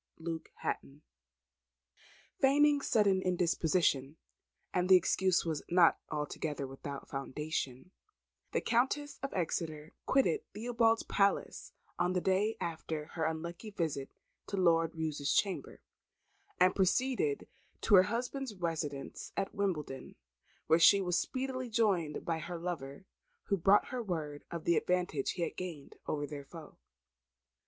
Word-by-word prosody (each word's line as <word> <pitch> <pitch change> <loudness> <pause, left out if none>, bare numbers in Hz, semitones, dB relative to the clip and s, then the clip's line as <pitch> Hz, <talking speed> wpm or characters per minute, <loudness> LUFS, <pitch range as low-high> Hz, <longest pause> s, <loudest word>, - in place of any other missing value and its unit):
Luke 165 0 -5
Hatton. 145 +2 -4 1.4
Feigning 285 +1 +5
sudden 200 -7 +3
indisposition 165 -5 +1 0.6
(and 180 0 +1
the 190 - +9
excuse 185 +1 +3
was 160 -3 -2
not 175 -1 +5
altogether 150 -1 -3
without 135 +1 -7
foundation), 135 +1 -4 0.6
the - - 0
Countess 265 +5 0
of 275 - -3
Exeter 160 -3 -3
quitted 260 -12 +3
Theobalds 230 0 +2
Palace 200 0 0 0.3
on 180 - +2
the 180 - +2
day 190 +4 +1
after 160 -2 -4
her 160 -2 -1
unlucky 170 +6 -4
visit 160 -8 -2 0.4
to 200 - -3
Lord 165 -3 +3
Roos's 155 -3 -1
chamber, 195 -2 -1 0.8
and 185 0 +5
proceeded 260 - +1 0.3
to 215 - +1
her 185 -2 +9
husband's 245 +1 -3
residence 160 -6 -4
at 195 0 -1
Wimbledon, 155 -9 -3 0.5
where 160 +1 +4
she 185 +5 +7
was 180 -2 +1
speedily 260 -1 -3
joined 195 -9 +1
by 165 -1 -1
her 170 +2 -5
lover, 165 -2 -5 0.4
who 200 - +4
brought 195 +3 +4
her 255 -1 -3
word 155 -8 -4
of 170 -2 -5
the 170 -2 +4
advantage 180 -6 0
he 175 - -2
had - - -3
gained 170 -6 -7
over 145 -1 -1
their 145 -1 -7
foe. 160 +2 -12
175 Hz, 130 wpm, -33 LUFS, 155-200 Hz, 1.4 s, the